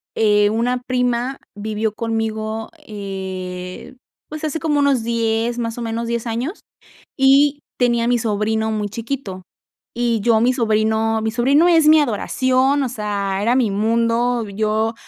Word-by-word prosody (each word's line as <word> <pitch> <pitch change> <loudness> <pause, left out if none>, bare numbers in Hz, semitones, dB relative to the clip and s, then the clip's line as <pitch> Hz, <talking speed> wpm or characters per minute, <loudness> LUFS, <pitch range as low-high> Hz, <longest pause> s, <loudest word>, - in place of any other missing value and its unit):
eh, 210 -1 +3
una 245 +3 0
prima 250 +1 -1 0.2
vivió 215 +1 -3
conmigo, 220 -1 -3 0.2
eh, 190 -1 -6 0.3
pues, 310 +1 -7
hace 310 +1 -2
como 300 -3 0
unos 275 -5 +2
10 230 0 0
más 230 0 -3
o - - -5
menos 230 0 -3
10 235 0 -2
años, 240 - -3 0.6
y 280 +2 +4 0.2
tenía 235 -1 +2
mi 245 0 +3
sobrino 220 0 -1
muy 210 -1 -2
chiquito, 225 -5 -5 0.5
y 235 -2 0
yo 225 0 +3
mi 250 +2 +3
sobrino 220 -1 +1
mi 220 0 -1
sobrino 275 +9 +3
es 325 -3 +4
mi 310 0 +7
adoración, 260 +2 +1
o 255 - -2
sea, 200 -4 -2
era 235 +4 +2
mi 235 -6 +2
mundo, 230 +2 +1
yo 215 +2 -1
230 Hz, 145 wpm, -20 LUFS, 215-250 Hz, 0.6 s, mi